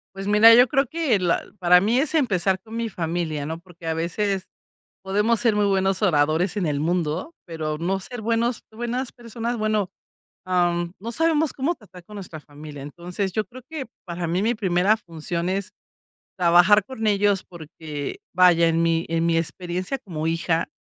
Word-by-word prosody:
Pues 195 0 -6
mira, 210 +3 +8
yo 245 +2 +7
creo 275 +1 +2
que 290 -7 +1
la 175 -2 +1 0.2
para 180 -1 +6
mí 220 +6 +2
es 285 +3 0
empezar 195 - +2
con 220 +3 -10
mi 230 0 -1
familia, 165 -5 -3
¿no? 160 +1 -4
Porque 170 -1 -14
a 160 - 0
veces 190 +4 -1 0.6
podemos 210 +4 +1
ser 230 -3 +2
muy 210 0 +2
buenos 195 0 +1
oradores 165 +1 +2
en 190 - 0
el 145 -2 -1
mundo, 170 - -1
pero 155 -3 -4
no 185 +4 -1
ser 240 +5 -7
buenos 230 +2 0
buenas 240 +3 -3
personas. 235 0 -4
Bueno, 215 -3 0 0.6
am, 175 -1 0
no 230 +4 -5
sabemos 320 +2 +1
cómo 295 +6 -1
tratar 185 - -15
con 210 +4 -13
nuestra 180 -5 -8
familia. 145 -1 -11
Entonces, 175 +6 -4
yo 215 +3 -1
creo 255 +1 -12
que 310 -4 -5 0.2
para 170 -1 -4
mí, 175 +3 0
mi 230 +4 +1
primera 195 0 +2
función 170 -2 -4
es 195 +2 -2 0.7
trabajar 180 +4 +5
con 225 -3 -4
ellos 205 -1 +2
porque, 155 -3 -7
vaya, 175 -2 +5
en 165 0 +2
mi 165 0 +1
en 165 0 0
mi 165 -1 +2
experiencia 180 +8 -3
como 165 -9 -5
hija 165 0 0
185 Hz, 180 wpm, -23 LUFS, 170-220 Hz, 0.7 s, mira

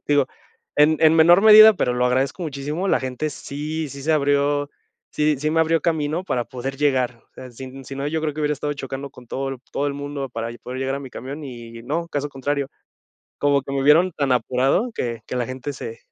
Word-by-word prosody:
digo, 145 -2 +3 0.5
en 150 +2 +5
en 160 0 +6
menor 170 +4 +6
medida, 215 0 +10
pero 125 - 0
lo 125 0 +2
agradezco 135 +7 0
muchísimo, 150 +4 -3
la - - +3
gente 130 +3 -3
sí 150 +3 -5
sí 140 0 -9
se 155 - -1
abrió 145 0 +1 0.4
sí 150 0 +1
sí 150 +2 -1
me 160 +1 +2
abrió 160 -1 +2
camino 160 +1 -1
para 125 -9 -1
poder 135 0 -6
llegar, 130 -4 +1
o - - -46
sea, 130 - -10
sin 130 +2 -10
si 135 - -8
no, 140 +1 -3
yo 160 +1 -1
creo 155 - -1
que 155 - -5
hubiera 150 0 +1
estado 145 +1 -3
chocando 135 0 -6
con 125 -1 -15
todo 135 +3 -3
el 135 - -6
todo 145 - -1
el - - -3
mundo 145 -1 -5
para 115 0 -4
y - - -10
poder 125 +1 -7
llegar 135 0 -1
a - - -6
mi 135 -2 -9
camión 140 +5 -7
y 115 -3 -9
no, 165 +7 -3
caso 145 -1 -2
contrario, 140 +1 -2 0.7
como 140 -1 +2
que 135 - -7
me 135 - 0
vieron 165 +6 +5
tan 140 -3 -1
apurado 130 - +1
que 115 -2 -3
que - - -5
la 125 - 0
gente 130 +3 -5
se 115 -3 -7
140 Hz, 230 wpm, -22 LUFS, 130-155 Hz, 0.7 s, medida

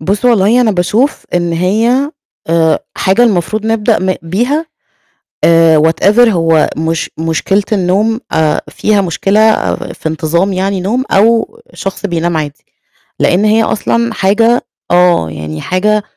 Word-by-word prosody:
بُص 200 +9 -2
والله 230 0 +3
أنا 225 -3 +2
باشوف 205 +9 0
إن 175 -1 0
هي 225 - +1 0.4
آآ 165 -1 +2 0.2
حاجة 195 +5 +2
المفروض 215 0 0
نبدأ 225 0 +1
م 185 0 -1
بيها، 245 - -1 0.8
آآ 165 -2 +4
whatever 205 +9 +3
هو 165 -5 +2
مش 160 +1 -2
مشكلة 165 +5 0
النوم 210 +4 0
آآ 155 -1 +1
فيها 210 -1 0
مشكلة 200 +4 +1
في - - -6
انتظام 165 +5 -1
يعني 190 +1 -1
نوم 235 +8 -1
أو 230 - +2 0.2
شخص 195 +1 -5
بينام 170 -1 -2
عادي، 150 -2 -5 0.6
لأن 185 +4 +2
هي 220 +1 +3
أصلًا 230 +1 -1
حاجة 225 +5 +2 0.3
آه 175 - +3
يعني 80 0 -7
حاجة 210 +3 0
195 Hz, 135 wpm, -12 LUFS, 165-220 Hz, 0.8 s, آآ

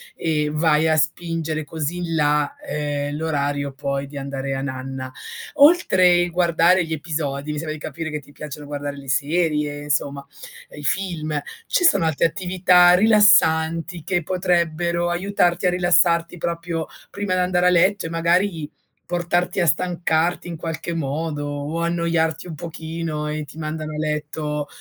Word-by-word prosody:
e 150 -2 0
vai 155 0 +3
a 160 - +3
spingere 155 0 -1
così 160 +2 -4
in 175 -2 -3
là, 150 -1 +1
ehm, 145 -1 -3
l'orario 145 -3 -1
poi 140 0 -3
di 140 +1 -10
andare 135 0 -4
a 135 - -2
nanna. 130 -1 -5 0.4
Oltre 185 - +5
guardare 175 +1 +3
gli 160 - -4
episodi, 150 -2 -3
mi 150 - -4
sembra 155 0 -3
di 155 - -8
capire 160 0 -5
che 150 - -3
ti 145 - -18
piacciono 145 +1 -8
guardare 145 0 -5
le 140 -1 -10
serie 150 +1 0
insomma, 140 -1 -1 0.5
i 150 - -9
film. 155 -3 -1 0.3
Ci 360 - +1
sono 195 - +5
altre 160 0 +2
attività 180 +1 +4
rilassanti 170 -5 +4
che 175 0 0
potrebbero 180 0 +1 0.4
aiutarti 175 0 +1
a - - +5
rilassarti 175 -1 +2
proprio 170 -1 -3 0.2
prima 200 -2 -3
di - - +1
andare 180 0 +2
a - - +6
letto 185 +2 +3
e - - -3
magari 170 -1 +1 0.4
portarti 175 +1 0
a - - +2
stancarti 170 +1 0
in 170 - -5
qualche 165 +1 -4
modo 150 0 -3
o 145 +3 -4
annoiarti 170 -1 0
un 165 - -7
pochino 160 -1 -5
e 150 0 -3
ti 145 - -14
mandano 155 0 -4
a - - -5
letto 150 -1 -3
160 Hz, 155 wpm, -22 LUFS, 150-175 Hz, 0.5 s, a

